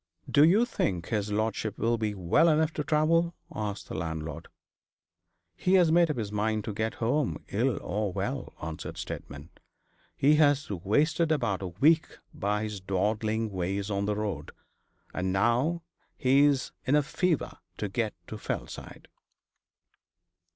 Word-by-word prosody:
'Do 145 - +5
you 195 +9 +5
think 90 - -2
his 105 -2 -1
lordship 110 0 -1
will 115 +2 +1
be 110 -2 -2
well 95 - +3
enough 160 0 +2
to 150 - -2
travel?' 165 +3 +2 0.2
asked 105 -1 -4
the - - -7
landlord. 80 -1 -4 1.1
'He 185 - +2
has 175 -4 +5
made 170 0 +5
up 150 - -1
his 105 -3 -3
mind 110 +1 0
to 110 - -4
get 110 +2 -2
home 130 +4 -1
ill 120 +3 +1
or 105 -1 -1
well,' - - -4
answered 80 0 -6
Steadman. 70 +4 -7 0.7
'He 150 +2 +4
has 145 -4 +3
wasted 150 - +1
about 120 -11 0
a 95 - -3
week 150 - +2 0.2
by 105 +1 -1
his 105 -2 -4
dawdling 110 +3 0
ways 100 +2 -2
on 100 0 0
the 105 0 0
road; 100 -8 -3 0.6
and 95 0 -1
now 120 - +1 0.3
he's 140 +1 +3
in 140 - +2
a 150 - +4
fever 160 +2 -1 0.2
to 105 - -2
get 110 +2 -2
to 110 - -8
Fellside.' - - -6
110 Hz, 150 wpm, -28 LUFS, 100-150 Hz, 1.1 s, Do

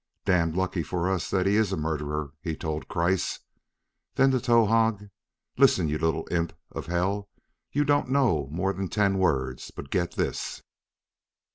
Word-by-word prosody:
"Damned 85 -3 +2
lucky 95 -1 0
for 90 +4 -1
us 90 -5 -1
that 95 -1 +1
he 100 +1 +3
is 110 -3 +2
a 95 - -1
murderer!" 75 -1 -2
he 80 -1 -3
told 80 -1 -4
Kreiss. 85 +2 0 0.7
Then 135 0 +5
to 130 - +2
Towahg: 115 -4 +2 0.5
"Listen, 80 - +5
you 75 +1 -1
little 80 0 0
imp 85 -1 0 0.2
of - - -6
hell! 95 +4 -1 0.4
You 145 - +2
don't 145 -2 +2
know 120 - +2
more 95 +5 0
than 95 0 -3
ten 100 -1 +1
words, 65 -8 0
but 70 - -10
get 85 -3 0
this!" - - -3
90 Hz, 160 wpm, -27 LUFS, 80-105 Hz, 0.7 s, Then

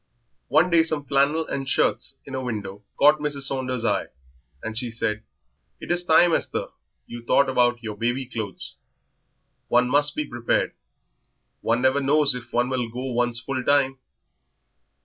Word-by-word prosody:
One 175 +3 +3
day 170 -1 +6
some 155 -3 -1
flannel 140 +4 +2
and 135 -1 -4
shirts - - 0
in 135 - -10
a 130 - -2
window 105 -5 -5
caught 150 +1 +5
Mrs. 145 -2 -3
Saunder's 130 -3 -2
eye, 105 -3 0 0.6
and 110 0 -5
she 120 +1 -2
said 110 -2 -2 0.6
"It - - -6
is 175 0 +4
time, 175 0 +5
Esther, - - -1 0.4
you 120 0 -8
thought 140 +4 +3
about 120 -2 +1
your 110 -2 -5
baby 120 +5 -1
clothes. 110 -5 -5 0.9
One 125 +1 +3
must 145 +3 +2
be 150 - -2
prepared; 120 -3 -1 0.9
one 120 +2 0
never 130 +2 +3
knows 145 +1 +4
if 120 -1 -8
one 120 +1 +1
will 125 -3 -2
go 125 +3 -5
one's 120 0 0
full 130 +1 -4
time." 135 -1 +2
130 Hz, 160 wpm, -24 LUFS, 120-145 Hz, 0.9 s, day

